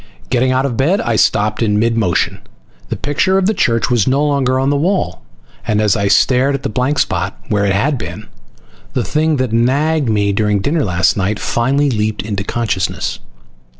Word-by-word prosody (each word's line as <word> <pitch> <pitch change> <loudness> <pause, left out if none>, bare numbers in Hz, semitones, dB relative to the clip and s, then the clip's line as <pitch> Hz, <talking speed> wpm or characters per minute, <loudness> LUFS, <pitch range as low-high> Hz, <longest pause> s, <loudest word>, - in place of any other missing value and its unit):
Getting 130 0 +2
out 130 +1 +1
of 130 -4 -2
bed, 165 +10 +2
I 115 - -1
stopped 105 0 +1
in 105 -2 +1
mid 115 +2 +1
motion. 100 -7 0 0.5
The - - -2
picture 145 +8 0
of 195 - +1
the 215 - +2
church 115 - +1
was 115 -5 +2
no 140 +3 +2
longer 135 -3 +1
on 135 +2 +1
the - - +1
wall. 180 +7 -1 0.5
And 105 -2 +1
as 105 -2 +2
I 100 -1 0
stared 130 +6 +3
at 135 - -6
the 135 - -2
blank 130 +3 -1
spot 95 -2 -1
where 100 -2 +1
it 100 - +1
had 130 +7 0
been, - - -7 0.7
the - - 0
thing 155 +1 0
that 130 -4 -1
had 115 - +2
nagged 145 +3 +1
me 100 -2 +1
during 105 0 +1
dinner 145 +9 0
last 90 -1 +1
night 100 +2 -1
finally 135 +4 0
leaped 105 -1 -1
into 100 -2 -3
consciousness. 105 -4 -2
120 Hz, 200 wpm, -16 LUFS, 105-140 Hz, 0.7 s, stared